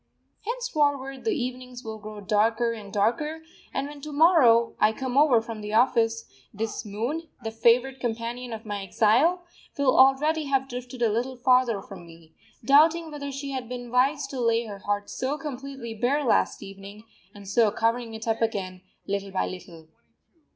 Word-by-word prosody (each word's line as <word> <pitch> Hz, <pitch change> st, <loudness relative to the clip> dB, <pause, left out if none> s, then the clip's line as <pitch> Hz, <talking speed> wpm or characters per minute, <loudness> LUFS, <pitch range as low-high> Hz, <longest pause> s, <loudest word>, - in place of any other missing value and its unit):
Henceforward 290 Hz, -, -1 dB
the 440 Hz, -3 st, +1 dB
evenings 250 Hz, -2 st, -5 dB
will 220 Hz, -1 st, -6 dB
grow 210 Hz, 0 st, -9 dB
darker 220 Hz, +3 st, +1 dB
and 210 Hz, -3 st, -9 dB
darker; 300 Hz, +11 st, 0 dB, 0.3 s
and 280 Hz, -, -2 dB
when, 290 Hz, 0 st, -10 dB
to 305 Hz, -, -7 dB
morrow, 285 Hz, -8 st, +5 dB
I 215 Hz, -, +4 dB
come 260 Hz, +1 st, -4 dB
over 275 Hz, -5 st, +5 dB
from 225 Hz, -2 st, -7 dB
the 210 Hz, 0 st, -6 dB
office, 230 Hz, -1 st, +2 dB, 0.3 s
this 220 Hz, +1 st, -4 dB
moon, 240 Hz, +11 st, -4 dB
the 225 Hz, -, -3 dB
favourite 240 Hz, +4 st, +2 dB
companion 240 Hz, +1 st, -4 dB
of 225 Hz, 0 st, -7 dB
my 205 Hz, -1 st, -4 dB
exile, 245 Hz, -, +2 dB, 0.3 s
will 280 Hz, -2 st, +3 dB
already 295 Hz, +4 st, +4 dB
have 270 Hz, -1 st, 0 dB
drifted 250 Hz, -1 st, -6 dB
a 225 Hz, -, +3 dB
little 245 Hz, +4 st, -2 dB
farther 245 Hz, -4 st, +2 dB
from 180 Hz, -3 st, -11 dB
me, 165 Hz, -1 st, -16 dB, 0.3 s
doubting 315 Hz, +4 st, +4 dB
whether 285 Hz, -1 st, -5 dB
she 275 Hz, +1 st, -5 dB
had 255 Hz, -3 st, -5 dB
been 245 Hz, -1 st, -6 dB
wise 275 Hz, +4 st, +2 dB
to 265 Hz, -2 st, -4 dB
lay 230 Hz, 0 st, +2 dB
her 205 Hz, -2 st, -8 dB
heart 205 Hz, +1 st, -2 dB
so 270 Hz, +3 st, -3 dB
completely 275 Hz, -5 st, -7 dB
bare 250 Hz, +7 st, 0 dB
last 245 Hz, -, +1 dB
evening, 195 Hz, +2 st, -11 dB, 0.3 s
and 200 Hz, -1 st, -12 dB
so 220 Hz, +2 st, +3 dB
covering 230 Hz, +1 st, -1 dB
it 220 Hz, +1 st, -7 dB
up 225 Hz, 0 st, 0 dB
again 190 Hz, -5 st, -2 dB, 0.2 s
little 200 Hz, 0 st, -3 dB
by 190 Hz, -, -1 dB
little. 170 Hz, -3 st, -9 dB
240 Hz, 170 wpm, -26 LUFS, 215-275 Hz, 0.3 s, morrow